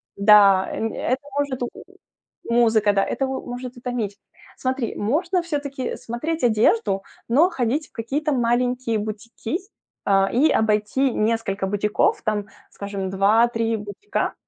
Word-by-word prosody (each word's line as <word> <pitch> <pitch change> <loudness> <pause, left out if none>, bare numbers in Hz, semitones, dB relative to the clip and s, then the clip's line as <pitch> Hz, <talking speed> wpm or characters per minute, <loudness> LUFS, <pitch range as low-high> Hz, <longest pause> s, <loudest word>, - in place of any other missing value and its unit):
да, 200 -2 +6
э, - - -5 0.2
это 255 +2 -1 0.2
может, 275 -3 -2
м, 240 - -2 0.8
музыка, 225 -3 +3
да, 195 - +3
это 270 +2 -1
м, 265 - -4 0.2
может 245 +1 -6
утомить. 240 -5 -4 0.4
Смотри, 260 -2 -2
можно 345 - 0
всё-таки 285 -5 -3
смотреть 305 +7 -4
одежду, 215 -3 +2 0.3
но 300 +10 +4
ходить 280 0 -1
в - - -48
какие-то 280 +7 -2
маленькие 245 -2 +1
бутики, 220 +6 -4 0.5
а, 195 -1 +3
и 285 +6 +4
обойти 220 +5 +1
несколько 215 -3 0
бутиков, 205 +1 +1
там, 210 -1 -1 0.2
скажем, 200 -1 -5
2-3 225 +4 +2
бутика, 210 - -3
230 Hz, 130 wpm, -23 LUFS, 210-260 Hz, 0.8 s, да